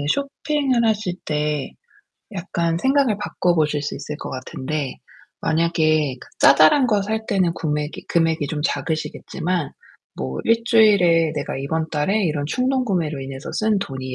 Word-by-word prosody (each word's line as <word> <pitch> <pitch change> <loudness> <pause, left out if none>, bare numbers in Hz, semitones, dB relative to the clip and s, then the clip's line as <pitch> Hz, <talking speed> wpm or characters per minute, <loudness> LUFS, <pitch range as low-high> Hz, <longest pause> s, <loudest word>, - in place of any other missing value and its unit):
쇼핑을 280 -2 0
하실 215 -4 0
때 150 -2 -1 0.6
약간 170 -3 -1
생각을 265 0 +2
바꿔 180 -4 0
보실 150 -2 +1
수 145 - -3
있을 150 - -6
것 - - -6
같은데 130 +2 -4 0.4
만약에 155 -3 +1
그 - - -13
자잘한 155 - +6
거 210 -4 +2
살 220 +2 -2
때는 185 -4 +1
금액이 150 -1 -3
금액이 165 -3 +1
좀 150 0 -3
작으시겠지만 160 +2 -2 0.5
뭐 65 0 -4
1 230 - +4
주일에 190 -9 +4
내가 - - -3
이번 160 +4 -2
달에 190 +8 +1
이런 150 -4 -1
충동구매로 200 - 0
인해서 135 0 -7
쓴 215 -1 +1
돈이 130 -7 -5
165 Hz, 295 characters per minute, -21 LUFS, 150-210 Hz, 0.6 s, 자잘한